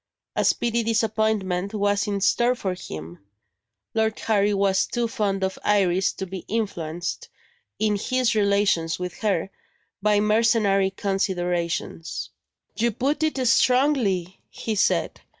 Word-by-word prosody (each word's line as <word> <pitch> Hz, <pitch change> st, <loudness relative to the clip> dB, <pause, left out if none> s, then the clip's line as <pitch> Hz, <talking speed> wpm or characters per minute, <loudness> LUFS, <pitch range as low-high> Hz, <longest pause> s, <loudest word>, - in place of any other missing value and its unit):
A -, -, +1 dB
speedy 235 Hz, 0 st, +1 dB
disappointment 220 Hz, -4 st, 0 dB
was 205 Hz, +1 st, +1 dB
in 200 Hz, -1 st, -2 dB
store 240 Hz, +5 st, +3 dB
for 190 Hz, -6 st, -2 dB
him. 80 Hz, -, -8 dB, 0.7 s
Lord 220 Hz, -1 st, 0 dB
Harry 210 Hz, -2 st, +2 dB
was 195 Hz, -1 st, +2 dB
too 240 Hz, -1 st, -1 dB
fond 200 Hz, -3 st, -1 dB
of 190 Hz, 0 st, -2 dB
Iris 190 Hz, -3 st, +2 dB
to 190 Hz, -, -5 dB
be 190 Hz, 0 st, -6 dB
influenced, 175 Hz, -6 st, -3 dB, 0.5 s
in 210 Hz, -1 st, +1 dB
his 255 Hz, +3 st, +1 dB
relations 200 Hz, -5 st, +2 dB
with 180 Hz, -1 st, -6 dB
her, 195 Hz, -4 st, 0 dB, 0.5 s
by 210 Hz, 0 st, +3 dB
mercenary 210 Hz, -2 st, +3 dB
considerations. 180 Hz, -4 st, -2 dB, 0.4 s
"You 235 Hz, +2 st, +1 dB
put 275 Hz, +7 st, -1 dB
it 315 Hz, -2 st, 0 dB
strongly," 230 Hz, -, +2 dB
he 225 Hz, -, -4 dB
said. 205 Hz, -, +1 dB
205 Hz, 125 wpm, -24 LUFS, 190-225 Hz, 0.7 s, store